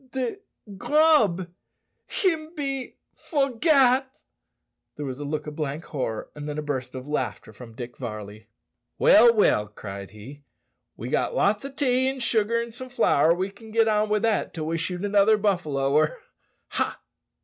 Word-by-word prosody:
"De 260 Hz, +6 st, -2 dB, 0.4 s
grub 290 Hz, -, +3 dB, 0.6 s
him 325 Hz, -4 st, -1 dB
be 275 Hz, -4 st, -3 dB, 0.2 s
forgat!" 270 Hz, -2 st, +2 dB, 0.8 s
There 150 Hz, -, -5 dB
was 130 Hz, 0 st, -5 dB
a -, -, -4 dB
look 150 Hz, +1 st, -3 dB
of 150 Hz, -1 st, -7 dB
blank 150 Hz, +1 st, -3 dB
horror, 125 Hz, -7 st, -4 dB
and 150 Hz, 0 st, -7 dB
then 145 Hz, -, -4 dB
a 150 Hz, -, -3 dB
burst 130 Hz, -4 st, -4 dB
of 130 Hz, +1 st, -7 dB
laughter 120 Hz, -8 st, -3 dB
from 115 Hz, 0 st, -12 dB
Dick 120 Hz, 0 st, -8 dB
Varley. 110 Hz, -3 st, -7 dB, 0.5 s
"Well, 235 Hz, +3 st, +7 dB
well," 205 Hz, -, +3 dB
cried 100 Hz, -2 st, -8 dB
he, 110 Hz, +8 st, -12 dB, 0.6 s
"we've -, -, -6 dB
got -, -, 0 dB
lots 205 Hz, +3 st, +2 dB
o' -, -, -4 dB
tea 260 Hz, -2 st, +1 dB
an' 270 Hz, 0 st, -5 dB
sugar, 230 Hz, -1 st, +1 dB
an' 235 Hz, 0 st, -4 dB
some 255 Hz, +3 st, -9 dB
flour; 165 Hz, -, +3 dB
we 190 Hz, +2 st, -2 dB
can 220 Hz, +3 st, -14 dB
git 225 Hz, 0 st, +3 dB
on 215 Hz, -1 st, +2 dB
wi' 210 Hz, -, +2 dB
that 220 Hz, 0 st, 0 dB
till 155 Hz, -2 st, -3 dB
we 165 Hz, +1 st, -2 dB
shoot 180 Hz, +4 st, -3 dB
another 205 Hz, +1 st, +4 dB
buffalo, 155 Hz, -10 st, 0 dB
or 155 Hz, +1 st, +5 dB
a 150 Hz, -, -8 dB, 0.5 s
ha!" -, -, -2 dB
190 Hz, 170 wpm, -25 LUFS, -, 0.8 s, Well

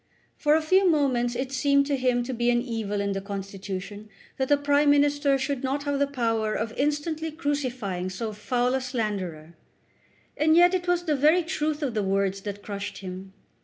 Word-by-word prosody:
For 300 Hz, 0 st, +3 dB
a 320 Hz, -, +1 dB
few 375 Hz, +4 st, +4 dB
moments 255 Hz, -6 st, +1 dB
it 260 Hz, +2 st, -3 dB
seemed 280 Hz, +1 st, +3 dB
to 285 Hz, 0 st, 0 dB
him 250 Hz, -2 st, +1 dB
to 260 Hz, +2 st, -4 dB
be 240 Hz, 0 st, +1 dB
an 240 Hz, 0 st, +3 dB
evil 225 Hz, -4 st, -3 dB
in 200 Hz, 0 st, -1 dB
the 195 Hz, 0 st, -2 dB
Constitution 200 Hz, +1 st, -6 dB, 0.3 s
that 265 Hz, -1 st, -1 dB
the 290 Hz, -, +5 dB
Prime 285 Hz, +1 st, +3 dB
Minister 285 Hz, -1 st, +3 dB
should 270 Hz, 0 st, -3 dB
not 275 Hz, +2 st, -1 dB
have 285 Hz, -1 st, -1 dB
the 280 Hz, -, +2 dB
power 225 Hz, -5 st, -1 dB
of 225 Hz, +1 st, -3 dB
instantly 300 Hz, +3 st, -1 dB
crucifying 255 Hz, -, -2 dB
so 215 Hz, +4 st, -4 dB
foul 245 Hz, +4 st, 0 dB
a 265 Hz, -, 0 dB
slanderer; 195 Hz, -, -4 dB, 0.8 s
and 315 Hz, +1 st, +3 dB
yet 350 Hz, +1 st, +6 dB
it 360 Hz, -1 st, -1 dB
was 355 Hz, 0 st, +1 dB
the 310 Hz, -4 st, +1 dB
very 310 Hz, +6 st, +4 dB
truth 305 Hz, -1 st, -2 dB
of 260 Hz, -5 st, -1 dB
the 215 Hz, -, 0 dB
words 195 Hz, 0 st, 0 dB
that 205 Hz, 0 st, -6 dB
crushed 200 Hz, -1 st, -5 dB
him. 190 Hz, 0 st, -8 dB
255 Hz, 195 wpm, -26 LUFS, 205-290 Hz, 0.8 s, yet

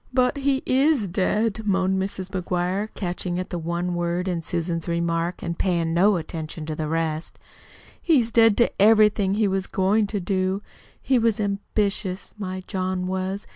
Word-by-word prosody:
"But 255 Hz, +2 st, +2 dB
he 275 Hz, -1 st, 0 dB
is 265 Hz, -4 st, +3 dB
dead," 210 Hz, +4 st, 0 dB
moaned 190 Hz, -2 st, +1 dB
Mrs. 190 Hz, -1 st, -4 dB
McGuire, 185 Hz, +3 st, -1 dB
catching 180 Hz, -1 st, -3 dB
at 185 Hz, -, -4 dB
the 175 Hz, -, -2 dB
one 170 Hz, +2 st, -2 dB
word 175 Hz, +1 st, -1 dB
in 175 Hz, -2 st, -1 dB
Susan's 165 Hz, 0 st, -3 dB
remark 170 Hz, +1 st, -1 dB
and 170 Hz, -1 st, -4 dB
paying 170 Hz, -3 st, +1 dB
no 195 Hz, +4 st, +4 dB
attention 160 Hz, -1 st, -5 dB
to 155 Hz, 0 st, -4 dB
the 155 Hz, 0 st, -3 dB
rest. 160 Hz, 0 st, -2 dB, 0.6 s
"He's 255 Hz, -9 st, +3 dB
dead 225 Hz, -2 st, +5 dB
to 235 Hz, -, +2 dB
everything 210 Hz, -2 st, +5 dB
he 215 Hz, -1 st, +2 dB
was 190 Hz, 0 st, -1 dB
goin' 205 Hz, +3 st, +2 dB
to 205 Hz, 0 st, -2 dB
do. 190 Hz, +1 st, -1 dB, 0.4 s
He 260 Hz, -1 st, +2 dB
was 225 Hz, -2 st, +1 dB
ambitious, 200 Hz, -1 st, -2 dB
my 185 Hz, -2 st, -4 dB
John 185 Hz, -1 st, -2 dB
was. 190 Hz, +2 st, -3 dB
190 Hz, 165 wpm, -24 LUFS, 175-210 Hz, 0.6 s, dead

